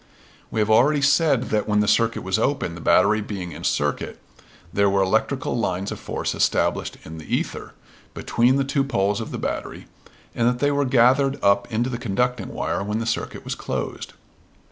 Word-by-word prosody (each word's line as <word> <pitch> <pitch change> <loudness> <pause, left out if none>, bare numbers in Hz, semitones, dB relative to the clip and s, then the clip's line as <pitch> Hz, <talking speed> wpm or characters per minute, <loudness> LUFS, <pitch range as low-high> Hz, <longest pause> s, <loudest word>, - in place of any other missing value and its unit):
We 110 - -3
have 105 +1 +1
already 140 +6 +4
said 140 -2 +3
that 105 -1 0
when 105 -1 +2
the 105 - +2
circuit 115 +1 +2
was 95 +3 0
open, 135 -8 0
the 85 - -9
battery 105 +6 +4
being 95 -4 -6
in 75 - -9
circuit, - - -1 0.6
there 100 0 +3
were 95 0 +2
electrical 110 +7 0
lines 95 -4 -2
of - - -6
force - - -3
established - - 0
in 80 +1 -9
the 80 - -2
ether, - - -4 0.4
between 120 +3 +2
the 140 - +2
two 135 +1 0
poles 105 -6 0
of - - -6
the - - -5
battery, - - -4 0.5
and 115 - +1
that 125 0 +1
they 145 +3 +1
were 145 0 +1
gathered 130 +2 +3
up 100 +3 +2
into 120 +3 0
the 120 - -4
conducting 125 +2 -1
wire - - -3
when 105 +2 -2
the 115 - -2
circuit 115 - -3
was - - -2
closed. - - -5
115 Hz, 190 wpm, -23 LUFS, 100-130 Hz, 0.6 s, already